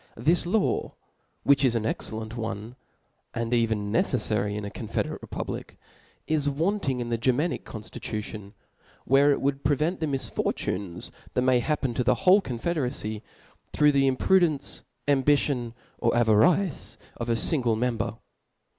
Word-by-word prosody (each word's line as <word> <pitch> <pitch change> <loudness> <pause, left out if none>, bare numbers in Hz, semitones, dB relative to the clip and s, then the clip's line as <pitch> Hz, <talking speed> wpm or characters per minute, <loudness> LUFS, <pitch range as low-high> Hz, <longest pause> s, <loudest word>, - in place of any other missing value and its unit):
This 165 +9 +2
law, 205 +3 0 0.5
which 140 0 +4
is 125 -3 +3
an 115 - 0
exceli^nt 110 0 -4
one, 110 0 -5 0.6
and 115 0 -2
^even 110 -4 +1
neceflary 105 -3 0
in 105 -1 -4
a 100 - -6
confederate - - -3
republic, - - -6 0.5
is 150 -2 +1
wanting 150 -2 0
in 120 -1 -3
the 115 -1 -1
Germanic 130 +8 0
conftii'ution, 105 -1 -6 0.5
where 140 +3 +5
it 140 - 0
woiild 140 0 0
pre 145 +1 +3
vent 160 +6 -1
the 160 - -1
misfortunes 100 -9 -3 0.2
that 125 - +2
may 130 -1 +4
happen 135 -1 -1
to 125 - 0
the - - +3
whole 190 +3 +7
confederacy, 125 - -2 0.5
through 150 0 +5
the 135 -1 +3
imprudence, 155 +3 +2 0.3
ambitionj^' 140 -3 +2 0.3
8r' 115 - +2
avarice 130 - +2 0.2
of 120 0 -4
a 115 - +3
fingle 120 -1 +2
member. 115 -2 -1
125 Hz, 140 wpm, -26 LUFS, 110-145 Hz, 0.6 s, whole